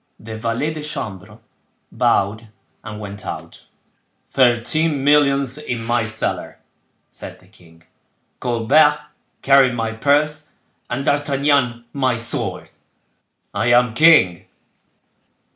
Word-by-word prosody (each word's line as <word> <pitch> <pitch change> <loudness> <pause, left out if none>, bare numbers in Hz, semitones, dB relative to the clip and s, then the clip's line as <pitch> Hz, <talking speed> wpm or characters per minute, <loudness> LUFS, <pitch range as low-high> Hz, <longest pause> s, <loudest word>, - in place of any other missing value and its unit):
The 110 0 -8
valet 115 +8 -2
de 155 - -7
chambre 105 -8 -6 0.5
bowed 110 -2 0 0.3
and 105 -1 -8
went 100 0 -7
out. - - -8 0.6
"Thirteen 135 +4 +1
millions 140 -2 +2
in 125 -6 -4
my 120 0 0
cellar," 110 0 -3 0.5
said - - -10
the - - -22
king; 80 -1 -21 0.6
"Colbert 140 +6 +3 0.5
carrying 135 -2 +5
my 115 -1 -2
purse 150 +5 0 0.4
and 135 +3 -3
D'Artagnan 140 -4 +1
my 130 -3 0
sword—I 115 0 -6
am 120 -1 +4
king." 135 - +4
120 Hz, 100 wpm, -19 LUFS, 115-145 Hz, 0.6 s, carrying